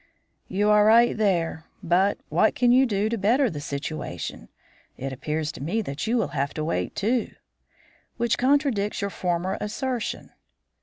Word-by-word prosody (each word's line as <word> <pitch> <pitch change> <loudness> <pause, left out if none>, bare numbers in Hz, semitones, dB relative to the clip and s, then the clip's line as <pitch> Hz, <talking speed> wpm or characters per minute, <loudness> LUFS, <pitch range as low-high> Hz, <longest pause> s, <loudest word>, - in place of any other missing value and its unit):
"You 205 +3 +1
are 210 0 +6
right 230 +2 +5
there, 170 -6 0 0.2
but 185 +4 +2
what 220 - +3
can 245 -1 +3
you 260 +2 +5
do 205 -1 0
to 230 0 -2
better 240 +6 +3
the 145 -3 -6
situation? 140 - -5 0.5
It 135 +1 -4
appears 150 +4 -3
to - - -11
me 200 +10 -1
that 140 +5 -4
you 240 +2 +2
will 225 - 0
have 140 -1 -2
to 155 - -2
wait 160 - -2
too." 230 +4 -1 0.8
"Which 235 -1 +1
contradicts 255 -7 +1
your 200 0 -2
former 180 +1 -2
assertion." 240 +3 -3
205 Hz, 160 wpm, -25 LUFS, 160-230 Hz, 0.8 s, are